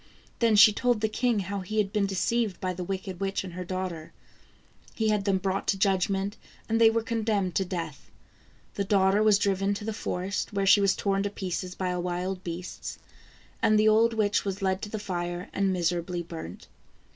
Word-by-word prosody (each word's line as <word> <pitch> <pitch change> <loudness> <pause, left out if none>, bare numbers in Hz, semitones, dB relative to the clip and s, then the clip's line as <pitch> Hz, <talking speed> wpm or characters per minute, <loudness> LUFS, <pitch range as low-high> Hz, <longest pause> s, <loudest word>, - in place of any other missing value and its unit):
Then 230 -2 +4
she 205 +1 +8
told 245 0 +1
the 220 - +1
king 230 -1 0
how 200 +2 -4
he 195 +3 -5
had 205 -1 +1
been 205 -2 +2
deceived 210 +2 0
by 185 -1 -2
the 180 0 -5
wicked 190 0 -5
witch 195 0 -1
and 185 -3 -8
her 180 +1 -5
daughter. 180 -3 -5 0.8
He 220 -1 +1
had 210 -2 +1
them 195 -2 +2
brought 190 +1 -2
to 195 - +2
judgment 195 +1 +1 0.3
and 225 0 +1
they 225 - +8
were 225 0 0
condemned 215 -5 -1
to 190 - +1
death. 165 -6 -6 0.6
The 200 - -1
daughter 195 0 +3
was 215 -2 +5
driven 200 0 +1
to 210 - -6
the 220 - -2
forest 195 +1 -3
where 200 -1 0
she 195 +1 +6
was 195 -1 +3
torn 195 -1 0
to 205 - -1
pieces 185 -2 -4
by 180 -1 -2
wild 180 +1 -3
beasts, 175 +1 -6 0.6
and 215 - +4
the 215 +1 +5
old 225 +1 +4
witch 205 -2 +1
was 195 0 -4
led 190 0 0
to 210 - -5
the 215 - -4
fire 175 -3 -4
and 195 -1 +1
miserably 175 0 -1
burnt. 160 - -9
195 Hz, 200 wpm, -27 LUFS, 185-210 Hz, 0.8 s, she